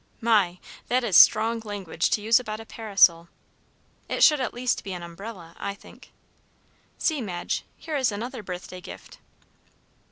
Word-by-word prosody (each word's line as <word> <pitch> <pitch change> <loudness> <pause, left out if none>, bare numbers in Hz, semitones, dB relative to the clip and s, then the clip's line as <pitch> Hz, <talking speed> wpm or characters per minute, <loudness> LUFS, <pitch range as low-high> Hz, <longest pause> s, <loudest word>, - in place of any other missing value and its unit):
My! 205 -6 +2 0.3
that 250 +1 +1
is 205 -7 0
strong 225 +5 +6
language 200 -6 -3
to 210 - 0
use 225 +3 +5
about 215 -3 -6
a 225 - -10
parasol. 195 -7 +3 0.8
It - - +1
should 300 -3 +6
at 250 - -2
least 245 +1 -1
be 195 - -6
an 175 -1 -7
umbrella, 170 0 -10
I 200 0 -4
think. - - -17 0.9
See, 310 -5 0
Madge, 180 -6 -4
here 315 -2 -6
is 260 -4 +1
another 235 +4 -5
birthday 180 -1 -8
gift." - - -12
215 Hz, 155 wpm, -25 LUFS, 180-235 Hz, 0.9 s, strong